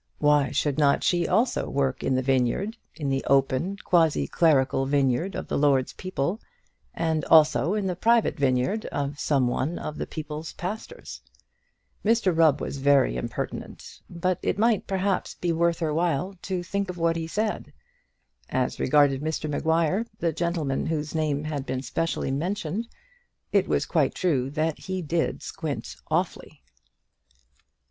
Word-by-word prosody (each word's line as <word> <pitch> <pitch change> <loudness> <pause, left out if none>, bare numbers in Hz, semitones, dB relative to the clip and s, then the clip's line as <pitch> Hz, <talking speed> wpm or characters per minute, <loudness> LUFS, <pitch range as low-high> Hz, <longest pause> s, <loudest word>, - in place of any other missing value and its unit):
Why 145 -2 +3
should 145 +3 0
not 140 -2 +3
she 175 -1 +2
also 225 +7 +1
work 135 -2 -1
in 130 - +1
the 130 - 0
vineyard, 135 - +1 0.2
in 150 - -4
the 135 0 0
open 135 +8 +2
quasiclerical 155 -5 +3
vineyard 140 +6 +1
of - - -5
the - - -1
Lord's 140 -3 +2
people, 185 - -3 0.5
and 160 -2 0
also 155 - +5
in 210 -2 -1
the 185 -2 -1
private 230 +4 +3
vineyard 135 - 0
of 145 0 -3
some 135 -4 +2
one 135 +7 -1
of 150 - -6
the - - -3
people's 155 0 -6
pastors? 220 - -7 0.8
Mr 215 -5 +2
Rubb 160 -3 +4
was - - -4
very 140 - +3
impertinent, 60 - -6
but 175 +1 -1
it - - -1
might, 220 -1 +2
perhaps, 195 0 -1
be 175 - -1
worth 170 0 +2
her 155 -2 -1
while 170 +3 0
to 185 -2 -3
think 200 +2 -2
of 180 - -5
what 165 0 +1
he 165 -1 -3
said. 210 +5 -2 0.8
As 130 0 -1
regarded 140 -1 +3
Mr 155 0 -2
Maguire, 165 +7 +1
the 170 -5 0
gentleman 165 -5 -1
whose 155 -2 -2
name 150 -2 0
had 150 -3 -3
been 130 -1 -3
specially 150 +1 -2
mentioned, 180 +7 -2 0.6
it - - +3
was - - +1
quite - - +1
true 140 -8 0
that 155 +2 -1
he 185 -1 -4
did 165 +2 -1
squint - - -5
awfully. - - -2
160 Hz, 155 wpm, -26 LUFS, 140-180 Hz, 0.8 s, also